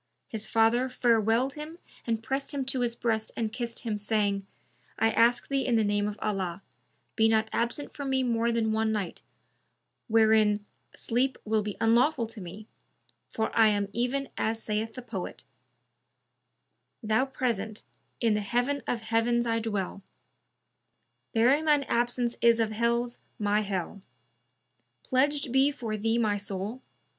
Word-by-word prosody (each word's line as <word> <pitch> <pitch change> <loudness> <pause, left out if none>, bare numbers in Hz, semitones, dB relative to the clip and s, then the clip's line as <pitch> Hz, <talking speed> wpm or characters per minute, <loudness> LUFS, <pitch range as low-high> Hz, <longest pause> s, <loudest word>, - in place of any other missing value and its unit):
His 215 -2 -5
father 230 +3 +3
farewelled 235 +1 +2
him 305 +3 -8 0.3
and 225 -1 -1
pressed 270 +5 -2
him 270 -2 -1
to 265 0 -1
his 240 -1 0
breast 220 -2 -1
and 220 -2 -2
kissed 235 -2 -4
him, 220 -3 -2
saying, 205 -2 0 0.5
"I 225 - +3
ask 235 +2 +3
thee 275 -1 0
in 245 - +1
the 220 - +3
name 205 0 +1
of 210 0 -4
Allah, 195 -3 -2 0.5
be 220 0 +4
not 220 0 +2
absent 240 +5 -2
from 280 -2 -4
me 265 -1 +2
more 235 -1 +1
than 225 -1 +1
one 220 0 +1
night, 205 -5 -3 0.9
wherein 215 -2 +4 0.3
sleep 255 +3 0
will 215 0 +2
be 205 -1 -5
unlawful 235 +3 +3
to 220 -1 -9
me, 190 +5 -9 0.6
for 220 - -2
I 225 -1 +6
am 205 -1 +1
even 255 +4 -1
as 225 +1 -1
saith 220 +1 -2
the 255 - -7
poet, - - -6 1.6
'Thou 220 +4 +2
present, 220 -5 -2 0.4
in 230 -3 +2
the 210 - 0
Heaven 245 +7 0
of 235 - -1
heavens 230 +2 +1
I 230 -1 +1
dwell; 205 -3 -3 0.7
* - - -49
Bearing 260 +7 +4
shine 295 -2 +4
absence 240 -1 0
is 235 -1 +5
of 220 -1 +1
hells 235 +2 0 0.2
my 210 -1 +1
Hell: 195 -1 -4 1.0
Pledged 280 0 +1
be 265 +2 +4
for 235 -7 -4
thee 225 +2 0
my 215 -3 +1
soul! 200 +4 -5
225 Hz, 155 wpm, -28 LUFS, 215-245 Hz, 1.6 s, I